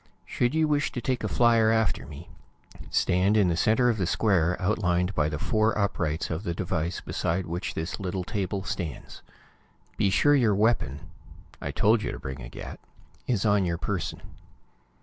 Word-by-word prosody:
Should 120 +5 0
you 160 -1 +3
wish 145 -1 +1
to - - -3
take 125 +1 -2
a - - 0
flier 115 -2 +4
after 105 -7 0
me, 75 +3 -10 0.6
stand 95 +4 +2
in 100 -4 +4
the 85 - +1
center 110 +8 +3
of 115 -3 +1
the 90 - 0
square 90 -5 +2
outlined 90 -2 0
by 75 -3 +1
the 75 - -3
four 110 +8 +1
uprights 85 -7 -1
of 80 +2 -2
the 85 -5 -3
device 85 -1 -2
beside 90 +2 -2
which 85 +2 -4
this 80 +2 -4
little 95 -1 -3
table 95 -1 -3
stands. 85 -6 -5 0.8
Be 100 - +2
sure 145 +9 +4
your 115 -8 +3
weapon 105 - 0 0.5
I - - -3
told 110 +1 +3
you - - -3
to - - -6
bring 65 -2 -6
a - - -8
gat - - -8 0.5
is 115 -5 0
on 105 -2 +3
your 85 -2 -1
person. 90 0 -3
95 Hz, 180 wpm, -27 LUFS, 85-110 Hz, 0.8 s, flier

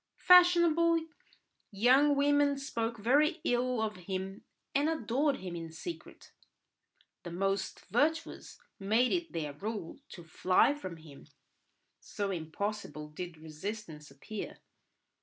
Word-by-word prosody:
Fashionable 340 -2 +5 0.6
young 260 +8 +4
women 285 0 +3
spoke 235 -4 -3
very 285 - +2
ill 245 0 +1
of 215 -2 -3
him 190 +1 -4 0.3
and 285 +3 +2
adored 285 -1 0
him 180 -2 -6
in 165 -1 -6
secret; 335 - -9 0.9
the 175 - -7
most 195 +2 -2
virtuous 310 - -1 0.2
made 220 +6 +2
it 340 -2 -1
their 150 -3 -4
rule 200 - -6
to 175 - -10
fly 185 - +3
from 185 - -7
him, 155 -3 -14 0.7
so 200 -1 -4
impossible 160 -2 -4
did 170 +2 -7
resistance 155 0 -7
appear. 145 +10 -7
215 Hz, 115 wpm, -31 LUFS, 175-285 Hz, 0.9 s, Fashionable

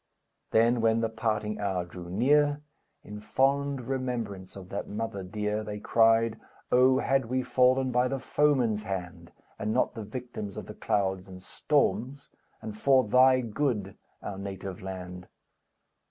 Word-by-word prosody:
Then, 115 +1 +3
when 115 0 +3
the 115 - 0
parting 110 -1 -2
hour 95 -3 -1
drew 85 0 -10
near, 145 +8 +2 0.4
In 105 0 -8
fond 135 +5 +1
remembrance 120 -7 -4
of 95 -2 -10
that 100 - -4
mother 105 -2 -4
dear, 105 +3 -3
They 105 -1 -5
cried: 115 +1 +3 0.3
"Oh 130 +1 +5
had 135 -1 +1
we 130 +2 -1
fallen 130 +1 +3
by 125 +1 +2
the 135 +1 -2
foeman's 130 -5 +1
hand, 90 -4 -6 0.3
And 110 +1 -1
not 125 - +1
the 115 - -6
victims 110 -2 -7
of - - -6
the - - -9
clouds 95 -2 -1
and 95 -1 -11
storms, 135 0 -1 0.3
And 110 -1 -6
for 130 +3 +4
thy 130 +3 +5
good, 115 -5 -2 0.3
our 95 -1 -5
native 95 -1 -6
land! 90 -1 -7
110 Hz, 150 wpm, -28 LUFS, 100-130 Hz, 0.4 s, Oh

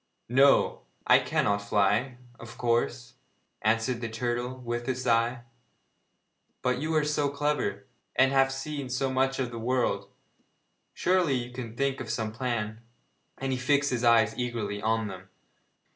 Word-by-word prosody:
'No, 135 +3 +4 0.2
I - - +7
cannot 100 0 +1
fly, 105 +5 +1 0.2
of 115 0 -11
course,' 115 - 0 0.5
answered 115 +3 +1
the 115 - -3
turtle, 120 +2 -2
with 120 -1 -4
a 130 - 0
sigh. 120 -1 +1 1.2
'But 125 0 +1
you 160 +3 -1
are 155 - +3
so 150 -1 +1
clever, 145 +1 -1 0.3
and 130 +1 +4
have 135 -1 +3
seen 135 0 -5
so 130 +1 -1
much 135 +1 +1
of 125 -2 -2
the 115 - -6
world 125 +2 0 0.9
surely 180 -5 +2
you 125 -1 -3
can 120 -3 -7
think 135 0 -1
of 115 - -6
some 110 -1 -2
plan?' 110 -2 -3 0.6
And 135 0 -3
he 130 - -1
fixed 140 +2 +2
his 125 -1 -1
eyes 115 -2 +5
eagerly 110 -4 -3
on 110 0 0
them. 95 -1 -9
125 Hz, 150 wpm, -28 LUFS, 115-135 Hz, 1.2 s, I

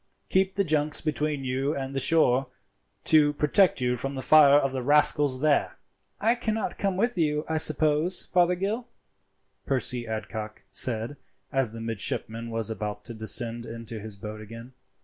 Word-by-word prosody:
Keep 190 0 +1
the 200 - +1
junks 150 -3 +1
between 150 -2 -2
you 135 +3 -2
and 135 0 -5
the - - 0
shore, 135 -4 +2 0.6
to 150 -2 +4
protect 155 +5 +2
you 125 0 +1
from 135 +3 -5
the 130 - -5
fire 150 -2 +6
of 135 -2 +1
the 130 -1 -3
rascals 145 -1 +3
there." 150 -2 +1 0.4
"I 225 +3 +3
cannot 225 -3 -3
come 195 -2 -1
with 235 -1 0
you, 150 -1 0
I 160 - -1
suppose, 155 +3 +4
Fothergill?" 190 +7 +1 0.8
Percy 125 -3 -1
Adcock 110 0 -6
said, 120 +3 0 0.3
as 135 -5 0
the 115 0 -9
midshipman 115 +1 -4
was 115 -1 -3
about 105 -1 -5
to 120 - -7
descend 115 +1 -1
into 115 -1 -7
his 105 0 -8
boat 105 +2 -8
again. 115 +4 -11
135 Hz, 160 wpm, -26 LUFS, 115-155 Hz, 0.8 s, fire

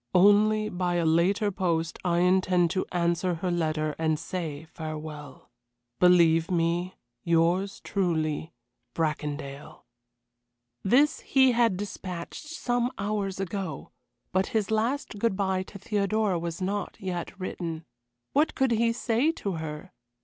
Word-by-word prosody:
Only, 210 +3 +5
by 180 -2 -1
a 170 -1 +1
later 190 +6 +3
post, 170 -3 -1
I 175 -1 +2
intend 180 -1 +3
to 190 0 -1
answer 175 0 +1
her 180 +2 -2
letter 155 -3 0
and 160 -1 +1
say 160 -2 -5
farewell. 155 -4 -8 0.5
"Believe 170 -2 +5
me, 175 +1 0 0.3
"Yours 170 +4 +2
truly, 160 -5 -1 0.4
"BRACONDALE." 150 -3 -3 1.0
This 275 +9 +3
he 265 -1 +4
had 230 -5 +2
despatched 185 - -6
some 245 -6 -1
hours 200 -2 -2
ago, 195 -2 -4 0.4
but 190 +1 +1
his 220 -1 -1
last 225 0 -1
good 230 -2 +1
bye 190 -2 +1
to 195 +2 -9
Theodora 205 -1 0
was 170 +2 -4
not 200 +1 -2
yet 185 +1 -5
written. 165 -3 -4 0.5
What 295 +3 +2
could 265 -2 +2
he 230 0 +3
say 245 +4 +1
to 200 - -4
her? 160 +3 -6
185 Hz, 130 wpm, -27 LUFS, 165-205 Hz, 1.0 s, Only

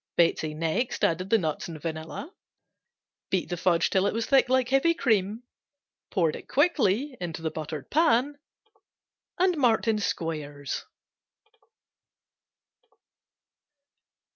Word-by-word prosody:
Betsey 160 -2 +2
next 165 +10 -1
added 185 +3 +1
the 225 - +5
nuts 160 -7 -2
and 165 -2 -8
vanilla, 160 - -6 1.0
beat 185 - -1
the 175 - -1
fudge 175 -1 +2
till 190 +1 +3
it - - -1
was 230 0 -1
thick 270 -1 +4
like 260 -1 +2
heavy 270 +6 +3
cream, 220 - +1 0.7
poured 165 -5 0
quickly 270 - +2
into 165 -2 -5
the 160 - -1
buttered 155 -2 -6
pan 285 -2 +2 1.0
and 365 0 +3
marked 240 -5 +2
in 220 -1 +2
squares. 150 -7 -3
190 Hz, 115 wpm, -27 LUFS, 160-260 Hz, 1.0 s, the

